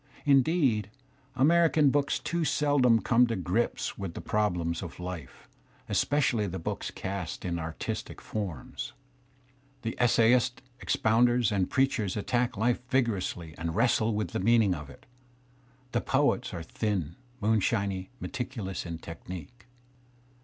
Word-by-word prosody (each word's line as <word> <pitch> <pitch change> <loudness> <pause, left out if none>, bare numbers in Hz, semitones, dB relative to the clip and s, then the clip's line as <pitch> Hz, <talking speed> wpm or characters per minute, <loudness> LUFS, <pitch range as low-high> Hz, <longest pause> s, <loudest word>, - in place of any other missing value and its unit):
Indeed, 135 - +3 0.5
American? 155 +1 +4
books 140 0 +1
too 170 -1 -2
seldom 140 -7 +3
come 125 +1 +4
to 115 - -1
grips 95 +6 -1
with 95 -4 -5
the - - -5
problems 90 -6 0
of 90 -2 -8
life, 90 -6 -7 0.4
especially 130 -7 +1
the 95 0 -4
books 80 - -4
cast 95 -3 -5
in 85 -1 -1
artistic 80 0 -5
forms. 100 -7 -5 0.9
The 115 - -3
essayists,, 120 +1 +3 0.2
expounders, 120 +1 +3
and 95 -3 +1
preachers 130 -7 +1
attack 120 +2 0
life 120 +3 +2
vigorously 100 - 0
and 80 0 -3
wrei^le 115 -1 +3
with 105 0 -1
the - - -3
meaning 110 -1 +4
of 75 -4 -7
it. 65 - -15 0.9
The - - +1
poets - - +1
are 85 - -5
thin, 90 -3 -2 0.2
moonshinyV 100 -3 +1
t - - -28
meticulous 110 -8 -4
in 85 -1 -4
technique. 90 +7 -9
110 Hz, 130 wpm, -29 LUFS, 90-125 Hz, 0.9 s, American